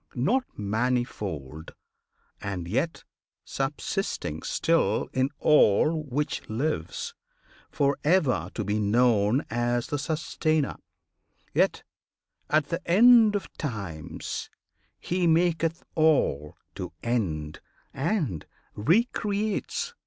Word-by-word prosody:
Not 235 - +1
manifold, 105 - -2 0.7
and 95 -4 -4
yet 145 - -1 0.4
subsisting 135 - -3
still 165 -11 +1
In 130 +1 +1
all 150 +3 +4
which 145 +2 -2
lives; 110 - -2 0.6
for 140 0 +1
ever 145 - +2
to 110 - -2
be 105 +2 -1
known 110 +3 +3
As 120 +1 0
the 145 - -3
Sustainer, 155 0 -1 0.8
yet, - - +2 0.7
at 150 -1 +2
the 170 +1 -2
End 225 +2 +7
of 205 - -4
Times, 85 - -5 0.5
He 180 0 0
maketh 165 0 +2
all 140 - +2 0.2
to - - -6
end 80 -11 -2 0.3
and 140 - -1 0.3
re 165 - +3
creates. 215 - -2
135 Hz, 95 wpm, -27 LUFS, 105-165 Hz, 0.8 s, End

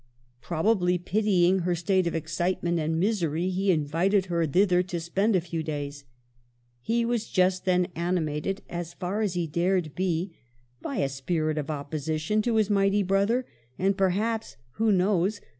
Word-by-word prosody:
Probably 180 +1 +1
pitying 190 0 +2
her 175 0 0
state 185 +1 +1
of 170 - -2
excitement 170 +2 -1
and 160 +1 -1
misery, 180 -3 0
he 190 +2 0
invited 175 +5 +2
her 170 -3 0
thither 180 +3 +3
to 180 -1 -4
spend 195 +6 +1
a 185 - +3
few 165 -1 -4
days. 145 -2 -5 0.8
He 235 - 0
was 235 -2 -1
just 185 0 +2
then 180 -1 +2
animated, 170 +1 -1
as 170 -1 -6
far 190 +4 -2
as 200 -4 -1
he 175 -1 0
dared 170 0 0
be, 180 -1 -2 0.5
by - - -4
a 140 - +1
spirit 155 +3 -1
of 145 +1 -5
opposition 155 +6 -1
to 230 +1 0
his 215 -2 +3
mighty 200 0 +2
brother; 200 +7 +1 0.3
and 195 +1 +1
perhaps 210 - 0
— - - -35
who 225 -1 +4
knows 195 +1 +2
180 Hz, 160 wpm, -27 LUFS, 165-195 Hz, 0.8 s, who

